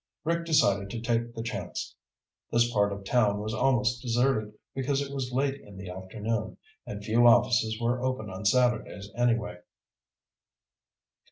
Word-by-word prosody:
Rick 170 +1 0
decided 100 -11 +3
to 115 - -4
take 115 0 -1
the 115 - -4
chance. 115 - -5 0.6
This 120 0 +2
part 100 -2 +3
of 100 0 -6
town 105 -1 +2
was 110 +1 -3
almost 125 0 +2
deserted, 120 -3 +1 0.2
because 135 +1 0
it 140 0 -4
was 130 -2 -3
late 135 +2 0
in 100 -2 -13
the 95 -2 -7
afternoon, 105 +4 -4 0.3
and 100 0 -6
few 115 +3 +4
offices 110 -1 +4
were 120 +1 0
open 130 -4 -2
on 95 0 -7
Saturdays, 110 -3 +1
anyway. 115 -6 0
115 Hz, 150 wpm, -28 LUFS, 105-125 Hz, 0.6 s, few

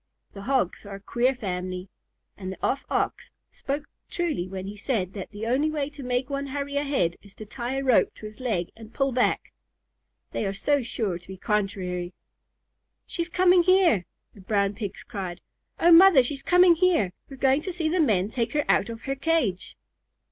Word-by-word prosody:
The 200 - -9
Hogs 260 -10 +1
are 200 -1 -8
a - - -9
queer 245 +6 +1
family, 185 -4 -4 0.5
and 185 -2 -6
the 190 - -8
Off 275 - 0
Ox - - -1 0.2
spoke 285 +2 -4 0.2
truly 325 - -2
when 190 0 -6
he 200 +1 -6
said 205 -4 -2
that 195 -3 -6
the 210 +1 -6
only 265 +6 +2
way 295 -2 -2
to 285 -1 -10
make 250 0 -1
one 280 0 -3
hurry 280 +1 -4
ahead 275 -12 0
is 200 -1 -17
to 215 - -9
tie 240 +4 -4
a 270 - -1
rope 255 -3 +4
to - - -11
his 215 0 -10
leg 210 -9 -2
and 225 0 -13
pull 275 -1 +1
back, 250 0 0 0.8
they - - -2
are 195 - -3
so 285 +7 +1
sure 215 -6 -2
to 170 - -20
be 190 0 -8
contrary. 185 -3 -2 0.9
"She's 340 -1 -3
coming 365 0 +5
here!" 350 - +4 0.3
the 200 - -15
Brown 200 0 +1
Pigs 205 -2 -6
cried. 190 -6 -6 0.4
"Oh, 345 - +5
Mother, 335 -5 +8
she's 275 +2 -4
coming 360 +1 +6
here! 330 - +2 0.2
We're 270 - -10
going 270 +2 +3
to 370 - -4
see 335 -2 -2
the 350 +3 +1
men 205 - +2
take 235 -2 -1
her 295 -1 +1
out - - +2
of 225 -1 -7
her 270 - -1
cage." 275 - -1
245 Hz, 195 wpm, -26 LUFS, 195-290 Hz, 0.9 s, Mother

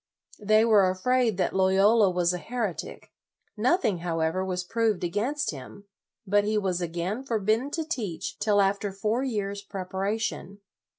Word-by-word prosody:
They 215 +1 +4
were 205 -5 +5
afraid 230 +3 +1
that 190 - 0
Loyola 195 +3 +4
was 180 -1 +1
a 180 - -3
heretic. 225 -3 -5 0.4
Nothing, 230 - +1
how 165 -1 -2
ever, 160 +4 0
was 185 -1 -2
proved 220 0 0
against 230 +12 -1
him, 150 +8 -11 0.4
but 205 +1 +3
he 215 +1 0
was 185 -3 -1
again 175 +8 -3
forbidden 225 +1 0
to 320 +1 -3
teach 220 - -4
till 205 -2 +3
after 200 +1 0
four 215 +5 -1
years' 200 -5 -3
preparation. 200 +1 -4
200 Hz, 150 wpm, -27 LUFS, 185-225 Hz, 0.4 s, were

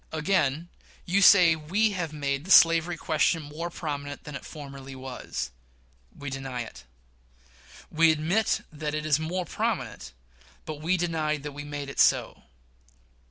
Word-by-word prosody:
Again: 160 -2 0 0.4
You 190 +3 +2
say 180 -5 +7
we 190 +8 +1
have 175 -5 -3
made 140 -2 -2
the 185 - -11
slavery 165 -1 +6
question 160 0 +1
more 155 +4 -5
prominent 145 -4 -5
than 150 - -9
it 140 - -7
formerly 140 -3 -9
was. 130 - -6 0.7
We 145 -1 -6
deny 135 -2 -4
it. 85 - -12 1.1
We 160 0 +5
admit 165 +8 +1
that 150 0 -3
it 150 0 -3
is 155 -1 +3
more 175 +3 -2
prominent, 70 - -3 0.5
but 155 -1 -6
we 175 +4 +1
deny 160 -3 -1
that 150 0 -7
we 145 +1 -7
made 145 -1 -6
it 140 - -7
so. - - +3
155 Hz, 150 wpm, -27 LUFS, 145-165 Hz, 1.1 s, say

